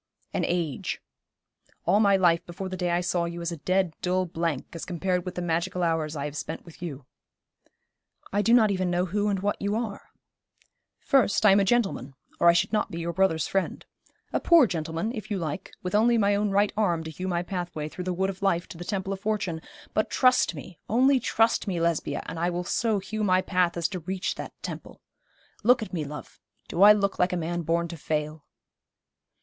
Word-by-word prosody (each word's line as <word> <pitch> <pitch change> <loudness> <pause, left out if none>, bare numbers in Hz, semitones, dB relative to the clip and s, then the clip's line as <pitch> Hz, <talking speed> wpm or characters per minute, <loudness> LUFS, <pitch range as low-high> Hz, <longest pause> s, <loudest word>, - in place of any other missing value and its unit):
'An - - 0
age. 170 -6 -2 0.9
All 205 - +4
my 200 -2 +5
life 170 -2 +3
before 185 +2 -6
the 185 - -4
day 180 -1 -1
I 175 +1 +1
saw 175 -1 0
you 170 0 -5
is 170 0 -3
a 170 - -5
dead, 185 +2 +1
dull 185 +1 +1
blank 165 -4 -2
as 165 - -6
compared 180 0 -1
with 185 - -5
the 180 - -3
magical 170 +1 -1
hours 160 -2 0
I 140 -1 -3
have 145 0 -5
spent 150 +3 -5
with 170 -1 -15
you.' 145 -6 -6 1.3
'I 205 - +3
do 225 - +2
not 225 -3 +6
even 185 -2 0
know 175 +1 +1
who 205 +3 -1
and 200 -2 0
what 205 +1 -1
you 200 +1 0
are.' 220 -3 -4 0.9
'First, 225 -6 +2
I 205 - +8
am 195 - +6
a - - +4
gentleman, 195 - 0 0.2
or 170 - +4
I - - +7
should 175 - +1
not 210 0 +1
be 170 -4 -6
your 170 0 -3
brother's 165 -4 +2
friend. 195 -1 -2 0.5
A - - +2
poor 335 -5 +6
gentleman, 165 +2 -2
if 215 -3 -7
you 205 - -1
like, 165 +1 -4
with 180 - -4
only 230 +3 +4
my 205 -2 +3
own 205 +1 +1
right 200 +1 +2
arm 175 -7 +1
to 160 - -6
hew 185 +4 -5
my 175 -1 0
pathway 175 -4 -4
through 180 +3 -7
the 185 - -1
wood 190 +2 0
of 190 - -14
life 180 -3 +1
to 170 - -10
the - - -5
temple 195 +1 -2
of 195 - -6
fortune; 200 -6 -2 0.3
but 215 - +1
trust 255 -8 +3
me, 165 +3 -10
only 260 +4 +4
trust 225 -1 +2
me, 180 -3 -1
Lesbia, 165 -3 -1
and 165 - -6
I 175 +1 +1
will 175 0 -2
so 220 +4 0
hew 215 +2 -4
my 185 -2 +3
path 180 -2 +1
as 170 -1 +1
to 185 - -4
reach 185 +3 -2
that - - -7
temple. - - -7 0.6
Look 240 +2 +4
at 215 - -9
me, 160 -4 -2
love. 150 +1 -9 0.3
Do 170 - -2
I 205 +1 +10
look 200 -2 +1
like 180 0 +2
a - - 0
man 175 +1 -2
born 170 +1 0
to 170 - -7
fail?' 155 0 -3
180 Hz, 220 wpm, -26 LUFS, 170-200 Hz, 1.3 s, I